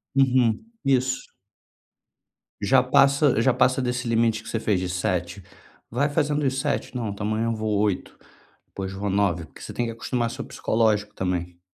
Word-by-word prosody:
Uhum, 130 - +3 0.2
isso. 130 -1 +1 1.4
Já 125 +6 +5
passa 140 -1 +4
já 130 +2 +3
passa 130 +2 +3
desse 125 -1 -2
limite 115 -1 +2
que - - -14
você 115 - -1
fez 105 -4 +1
de 90 0 -3
7. 90 0 -2 0.5
Vai 140 +6 +1
fazendo 150 0 0
os 135 0 0
7, 135 - -2
"Não, 115 -3 -2
então 100 +1 -4
amanhã 110 +1 0
eu 115 - 0
vou 110 -1 -1
8, 105 -3 -1 0.5
depois 95 -1 -6
vou 100 +1 -3
9", 95 -4 +1
porque 80 - -16
você - - -7
tem 120 - -1
que 115 - -3
acostumar 115 +1 -2
seu 130 +4 -6
psicológico 105 -2 0
também. 90 -1 -3
115 Hz, 175 wpm, -24 LUFS, 100-130 Hz, 1.4 s, Já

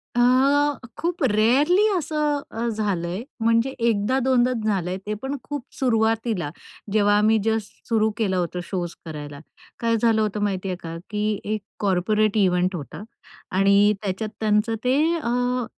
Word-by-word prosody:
अ, - - +1 0.8
खूप 345 -1 -2
रेअरली 270 - +4
असं 300 -2 0
अ, 230 +1 -3
झालंय 200 -3 -2 0.2
म्हणजे 230 +3 +3
एकदा 230 +1 +1
दोनदाच 250 -2 +2
झालंय 185 -3 -1
ते 210 - -2
पण 270 +1 -3
खूप 290 -3 -5 0.2
सुरुवातीला, 225 - +1 0.4
जेव्हा 205 -1 +4
आम्ही 215 +1 +4
जस्ट 220 -2 -3
सुरू 220 -1 +3
केलं 200 -5 0
होतं 180 0 -2
शोज 175 -2 -4
करायला. 145 -3 -7 0.4
काय 230 -1 +1
झालं 225 -1 +2
होतं 210 -1 -1
माहिती 195 -2 -1
आहे 185 - -2
का, 165 0 -6
की 210 0 0
एक 215 0 -2 0.2
कॉर्पोरेट 205 - +1
कॉर्पोरेट 210 +4 +1
इव्हेंट 185 -1 +2
होता 155 +3 -7 0.6
आणि 200 +2 +5
त्याच्यात 205 +2 -3
त्यांचं 215 +1 +1
ते 255 +2 +2 0.2
अ, 245 -2 0
215 Hz, 150 wpm, -23 LUFS, 195-235 Hz, 0.8 s, आणि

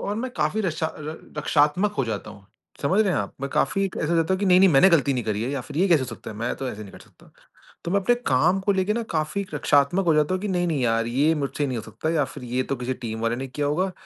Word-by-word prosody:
और 205 - -3
मैं 255 +3 -3
काफ़ी 155 +8 0
रक्षा 165 -3 -1
र 155 +1 -6 0.2
रक्षात्मक 150 +8 +2
हो 135 - +2
जाता 105 -1 -4
हूँ। 100 -2 -15 0.4
समझ 185 +9 +2
रहे 200 -4 +2
हैं - - +1
आप? 100 - -6
मैं 140 - -3
काफ़ी 195 +7 +1
एक 190 - -4
ऐसा 150 - -1
हो 170 - +2
जाता 165 +3 +2
हूँ - - -3
कि 200 - +1
नहीं-नहीं 185 +1 +6
मैंने 150 +7 +6
गलती 140 -4 +3
नहीं 125 - -2
करी 105 0 -1
है 125 - -2
या 140 -2 -2
फिर 145 - -10
ये 190 - +4
कैसे 165 -4 +5
हो - - -4
सकता 115 -1 -8
है? 105 - -9
मैं 115 +3 -2
तो 135 - -4
ऐसे 105 -2 -6
नहीं 100 - -11
कर - - -12
सकता। - - -20 0.6
तो 170 - -2
मैं 200 - +3
अपने 240 +6 +3 0.2
काम 175 +9 +3
को 200 +1 +1
लेके 190 +2 +1
ना 230 0 -2
काफ़ी 155 +6 -1
रक्षात्मक 145 +6 +2
हो 165 - +4
जाता 150 +4 +2
हूँ 185 - -4
कि 210 - -2
नहीं, 180 -2 0
नहीं 150 -5 -1
यार 115 -1 +1
ये 140 +7 +2
मुझसे 145 0 -2
नहीं 125 -2 -3
हो 110 - -5
सकता 115 +8 -4
या 155 -4 +2
फिर - - -8
ये 130 +1 +1
तो - - +2
किसी 125 +1 -3
टीम 110 0 -4
वाले 115 +1 0
ने 135 - -5
किया 145 +3 -2
होगा 185 +6 0
150 Hz, 305 wpm, -24 LUFS, 125-185 Hz, 0.6 s, नहीं-नहीं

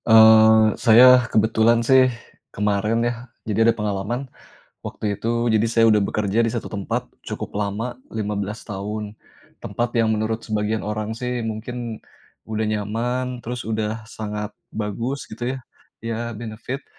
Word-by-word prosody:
Eee, 110 0 +8 0.2
saya 125 +1 +7
kebetulan 110 +2 +3
sih 130 0 +6 0.4
kemarin 105 +3 0
ya, 120 - +1 0.3
jadi 110 +2 +3
ada - - +4
pengalaman, 105 +5 -2 0.6
waktu 105 -2 -3
itu 120 +2 0
jadi 110 -1 +3
saya 115 -1 +4
udah 105 -2 +4
bekerja 105 +3 0
di 115 - 0
1 120 - -4
tempat 100 -2 -3 0.2
cukup - - -6
lama, 105 +4 -2 0.2
15 105 -1 -3
tahun, 105 +1 -5 0.5
tempat 120 +1 -1
yang 110 -1 +3
menurut 110 +1 -2
sebagian 110 0 -1
orang 105 +1 -3
sih 125 +1 -3
mungkin 115 +1 -5 0.5
udah 110 0 -2
nyaman, 120 +4 -2
terus 120 0 -5
udah 110 0 -3
sangat 105 -2 -5 0.2
bagus, 115 +6 -3
gitu 120 +4 -3
ya, - - -7 0.5
ya 115 -1 -2 0.2
benefit. 115 +4 -6
110 Hz, 140 wpm, -22 LUFS, 105-120 Hz, 0.6 s, Eee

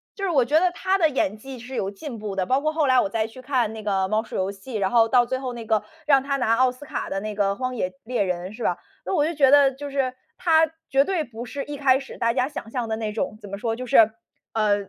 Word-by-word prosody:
就 395 - -7
是 390 - +1
我 275 -8 +3
觉 300 +5 +4
得 360 +1 +2
他 375 +2 0
的 320 -3 +4
演 215 -7 -1
技 265 +3 -9
是 245 +2 -10
有 195 -6 -1
进 230 +4 -8
步 210 -2 -5
的， 190 -1 0
包 260 +8 +2
括 310 +1 +1
后 310 -1 +1
来 255 -2 +5
我 200 - +1
再 220 +1 0
去 230 +3 -11
看 250 -5 0
那 220 - -7
个 195 -2 0
《猫 215 +2 +1
鼠 225 - -10
游 190 +1 0
戏》， 215 +4 -7
然 190 -1 0
后 230 -2 +4
到 245 +1 +5
最 260 +2 -2
后 255 -2 -4
那 235 -2 -7
个， 220 -1 +1 0.2
让 280 -3 +5
他 275 +1 -1
拿 235 -4 +2
奥 255 +1 +3
斯 255 +3 -12
卡 - - -4
的 195 - -2
那 215 +1 -4
个 200 -1 +1
《荒 255 +2 -3
野 185 -6 -1
猎 245 0 -1
人》， 180 -1 -2
是 240 - -11
吧？ 180 - +1 0.3
那 190 - 0
我 295 - +3
就 330 - -1
觉 280 -4 +4
得 280 -1 +6
就 285 +2 -7
是， 270 -2 -1 0.2
他 320 -2 +4 0.2
绝 270 +1 +4
对 350 0 -1
不 235 -3 -8
是 275 +4 -5
一 295 0 -6
开 265 -2 +4
始 275 - -10
大 230 - +2
家 250 +2 +1
想 290 -6 -7
象 240 0 -3
的 220 - -1
那 220 -1 -3
种 215 0 -3
怎 205 - -10
么 200 - -5
说 225 +2 -2
就 255 +2 -6
是 270 - +4 0.6
呃， 215 -2 +3
250 Hz, 315 characters per minute, -24 LUFS, 215-275 Hz, 0.6 s, 得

